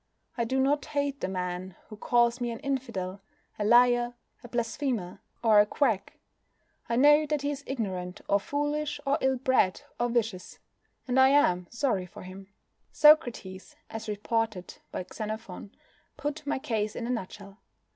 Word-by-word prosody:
I 235 - 0
do 265 +3 0
not 280 +2 +2
hate 285 -1 -2
the - - -1
man 180 0 -4
who 215 - -8
calls 240 +2 +2
me 240 - -1
an 230 - -4
infidel, 205 -9 -3 0.4
a - - 0
liar, 240 +2 +4 0.3
a - - -9
blasphemer, 235 -4 -2 0.2
or 220 -2 +6
a 205 - +6
quack. 220 -6 0 0.7
I 235 - +1
know 295 +4 +6
that 295 -1 -1
he 285 - 0
is 280 -1 -6
ignorant, 190 -7 -4
or 200 - +3
foolish, 290 +5 -2
or 275 +1 +1
ill 265 0 +2
bred, 250 -7 +2 0.2
or 240 0 +1
vicious, 225 -6 -2 0.5
and 255 +1 +2
I 265 0 +7
am 180 -11 +3
sorry 230 -7 -1
for - - -11
him. 190 +2 -11 0.4
Socrates, 245 -11 +3 0.2
as 225 -1 -6
reported 215 -2 -2
by 180 - -4
Xenophon, 215 -3 -6 0.5
put 295 0 -4
my 290 - 0
case 215 -5 -2
in 235 - -4
a 245 - -2
nutshell. 200 -3 -6
235 Hz, 160 wpm, -28 LUFS, 200-270 Hz, 0.7 s, I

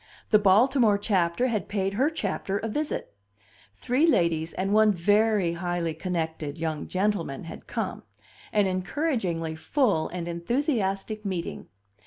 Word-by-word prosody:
The 215 - +7
Baltimore 215 +2 +4
Chapter 195 +1 +1
had 215 -4 -2
paid 195 -1 -1
her 265 +8 +2
Chapter 200 -9 -2
a 225 - -3
visit. 295 +7 -3 0.6
Three 255 - +1
ladies 165 - +2
and 195 +2 -1
one 215 0 +6
very 205 0 +2
highly 175 -1 -2
connected 160 -3 -3
young 160 -2 -3
gentleman 185 -7 -1
had 165 - -10
come - - -3 0.5
an 210 -1 +3
encouragingly 185 - -1
full 200 - +1
and 175 -1 -5
enthusiastic 210 - -1
meeting. 185 -4 -4
195 Hz, 130 wpm, -26 LUFS, 170-220 Hz, 0.6 s, The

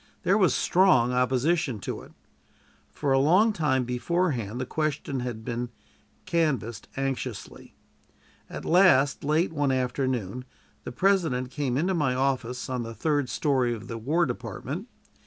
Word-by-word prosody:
There 195 - +3
was 195 -4 +3
strong 170 -10 +3
opposition 130 +2 +1
to - - -5
it. - - -14 0.8
For 145 -2 -2
a 135 - +4
long 185 +11 +4
time 140 -7 +1
beforehand 125 - -1
the 130 - -2
question 150 -2 -2
had 120 -3 -5
been 120 +1 -3 0.6
canvassed 135 - -1
anxiously. 135 -5 -5 0.7
At - - -7
last, 165 -6 +4
late 155 +4 +1
one 145 -3 +1
afternoon, 125 -3 -2 0.4
the - - -5
President 155 -6 +1
came 135 -2 -1
into 180 +6 +1
my 145 -7 +1
office, 130 -2 -1
in 125 -2 -2
the 115 -1 -6
third 145 -3 0
story 130 -6 +1
of 110 - -10
the 115 -1 -5
War 155 +9 +1
Department. 125 - -5
135 Hz, 140 wpm, -26 LUFS, 125-160 Hz, 0.8 s, a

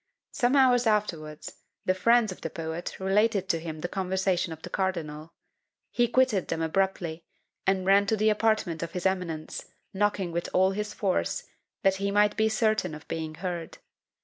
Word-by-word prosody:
Some 255 0 +2
hours 250 -3 +5
afterwards, 165 -8 -1 0.3
the 185 - +3
friends 230 +3 +3
of 185 - -9
the 165 - -3
poet 160 +1 -5
related 200 +1 +2
to 165 - +2
him 160 -1 -6
the 175 - -1
conversation 185 -2 0
of 160 0 -9
the - - -6
cardinal. 165 -4 -3 0.6
He 240 0 +2
quitted 245 -6 +2
them 165 - -2
abruptly, 170 -1 -1 0.4
and 190 -1 +2
ran 200 +1 +5
to 220 - +2
the 215 +1 +3
apartment 215 -6 +1
of 170 0 -5
his 180 0 -4
eminence, 180 -5 -2 0.3
knocking 195 -2 0
with 170 +1 -2
all 190 +1 +4
his 210 +1 -3
force, 195 -3 0 0.4
that 195 -1 +3
he 200 +1 -1
might 205 +1 +3
be 220 0 +2
certain 215 -6 +1
of 155 - -12
being 160 -1 -4
heard. 175 -1 -5
190 Hz, 175 wpm, -28 LUFS, 170-210 Hz, 0.6 s, hours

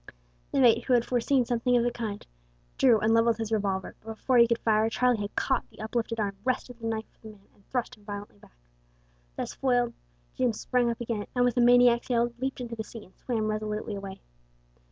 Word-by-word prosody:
The - - +1
mate, 245 -4 +5
who 260 - +2
had 240 -1 +3
foreseen 250 +1 +1
something 245 +1 +1
of 235 - +2
the 240 - +1
kind, 220 -4 -5 0.5
drew 240 -5 +5
and 220 +1 +2
levelled 230 0 +3
his 225 -1 -4
revolver, 195 -3 -1
but 225 0 -7
before 250 +2 +2
he 235 - +7
could 235 0 +1
fire 220 -1 +2
Charlie 245 -1 +1
had 205 0 -5
caught - - 0
the - - -19
uplifted 230 +1 -2
arm, 200 -2 -2
wrested 250 -1 -2
the 230 - -4
knife 220 0 -2 0.2
from 220 -1 -10
the - - -18
man, 195 - -27
and 200 - -27
thrust 250 -2 -2
him 210 - -22
violently 205 - -8
back. - - -21 0.8
Thus - - -4
foiled 245 -3 +1 0.4
Jim 250 -3 +1
sprang 245 +2 0
up 230 - -3
again 225 -3 -3
and 245 0 +3
with 245 - +1
a 245 - +3
maniac's 245 0 +5
yell 240 -1 +1
leaped 265 +1 -3
into 240 -2 -5
the 220 - -4
sea, 220 0 -11
and 190 - -23
swam 225 -4 -2
resolutely 215 0 -3
away. 195 -1 -7
230 Hz, 220 wpm, -28 LUFS, 215-245 Hz, 0.8 s, he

